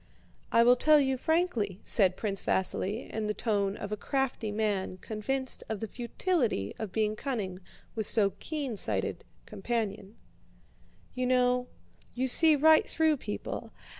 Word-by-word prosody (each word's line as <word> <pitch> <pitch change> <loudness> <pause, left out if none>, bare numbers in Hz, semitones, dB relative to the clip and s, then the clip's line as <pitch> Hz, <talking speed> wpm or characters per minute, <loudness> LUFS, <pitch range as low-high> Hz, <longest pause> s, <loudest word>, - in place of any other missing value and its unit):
"I 230 - +5
will 245 +1 +6
tell 305 +3 +5
you 265 -2 +1
frankly," 255 - 0
said 185 -4 +3
Prince 200 -3 -2
Vasíli 195 +4 -1
in 220 -1 -3
the 210 - -2
tone 205 -3 -1
of 200 - -6
a - - 0
crafty 255 -1 -2
man 205 -3 -1
convinced 260 +7 -3
of 220 -2 -3
the 225 - -4
futility 240 - -1
of 220 -4 -4
being 215 0 0
cunning 210 -8 -4 0.3
with 220 -2 -2
so 200 -3 +3
keen 290 -7 -4
sighted - - 0
a - - -34
companion. 210 -1 -4 1.0
"You 255 0 -1
know, 250 0 +2 0.5
you 255 +1 0
see 310 +4 +6
right 315 +2 +5
through 315 -2 +2
people. 105 - -6
225 Hz, 150 wpm, -29 LUFS, 205-265 Hz, 1.0 s, will